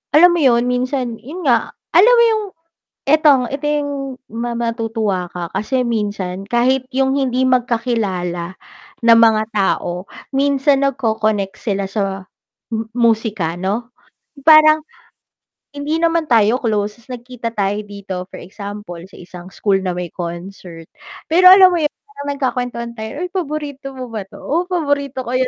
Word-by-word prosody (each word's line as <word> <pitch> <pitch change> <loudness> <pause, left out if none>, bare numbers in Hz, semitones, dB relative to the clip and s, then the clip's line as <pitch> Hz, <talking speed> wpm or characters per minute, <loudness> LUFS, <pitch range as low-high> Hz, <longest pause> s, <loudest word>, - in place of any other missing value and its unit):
alam 350 +3 +8
mo 345 - 0
'yon, 240 -3 +4
minsan 250 -2 -1
'yun 325 +8 -8
nga, 245 +3 +2 0.2
alam 445 +8 +7
mo 470 - +6
'yung 435 -1 0 0.7
itong 295 -3 +5
ito 280 +2 -4
'yung 295 -1 0 0.4
ma 235 +1 -4
matutuwa 225 -5 -2
ka 175 -1 -5
kasi 255 +4 0
minsan, 205 -4 -3
kahit 255 +3 +1
'yung 270 +1 +2
hindi 260 -1 0
magkakilala 215 -8 -1 0.5
na 230 0 +7
mga 220 -1 +5
tao, 190 -2 -1 0.2
minsan 275 0 +2
nagko-connect 220 -6 -1
sila 200 -3 -2
sa 195 -2 -2 0.5
mu 225 0 -2 0.3
musika 205 -7 -3
'no, 215 +6 -3 0.6
parang, 310 0 +7 0.9
hindi 290 +3 -3
naman 335 -1 +2
tayo 230 -2 +3
close 210 -3 -1
tas 250 +2 -11
nagkita 240 -1 -6
tayo 200 -1 0
dito, 195 -3 -6
for - - -8
example 200 -2 -8
sa 190 - -21
isang 180 0 -11
school 200 -2 +1
na 185 -2 -2
may 175 -1 -4
concert, 170 -1 -8 0.4
pero 360 +3 +4
alam 380 -1 +8
mo 350 - 0
'yun 300 -1 0 0.2
parang 285 -8 -7
nagkakuwentuhan 245 -3 -3
tayo, 250 +9 -6
"ay 360 - -3
paborito 290 -6 -4
mo 255 -2 -7
ba 210 -4 -5
'to, - - -14
oh 340 +5 -1
paborito 285 -7 -1
ko 240 - -6
'yan." 255 0 +1
235 Hz, 150 wpm, -18 LUFS, 200-280 Hz, 0.9 s, alam